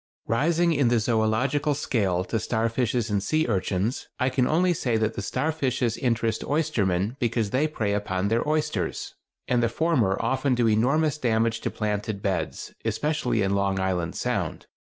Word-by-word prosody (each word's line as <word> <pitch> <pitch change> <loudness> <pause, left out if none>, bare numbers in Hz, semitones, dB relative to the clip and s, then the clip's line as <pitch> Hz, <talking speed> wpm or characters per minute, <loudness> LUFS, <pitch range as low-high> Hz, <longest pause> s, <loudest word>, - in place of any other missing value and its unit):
Rising 165 +8 +2
in 140 -4 +2
the 120 - +3
zoölogical 120 +6 +1
scale 100 -10 0
to 110 +5 -2
starfishes 115 0 0
and 100 -1 +1
sea 155 +10 +1
urchins, 100 +2 -1
I 130 0 +2
can 130 -1 +1
only 175 +3 +3
say 120 -8 0
that 110 0 0
the - - -4
starfishes 130 - -1
interest 115 -3 0
oystermen 115 - 0
because 115 -4 0
they 140 +4 +2
prey 110 -9 -2
upon 100 -2 -1
their 115 +2 +2
oysters, 155 0 -1 0.3
and 125 -1 +2
the 115 - +2
former 125 - +1
often 130 +2 +1
do 120 -1 +2
enormous 140 +8 +2
damage 115 -2 +1
to - - -1
planted 105 -1 -3
beds, 95 -2 -2
especially 135 -8 0
in 95 0 +1
Long 100 -1 +1
Island 90 -3 -1
Sound. - - -2
115 Hz, 160 wpm, -25 LUFS, 105-140 Hz, 0.3 s, the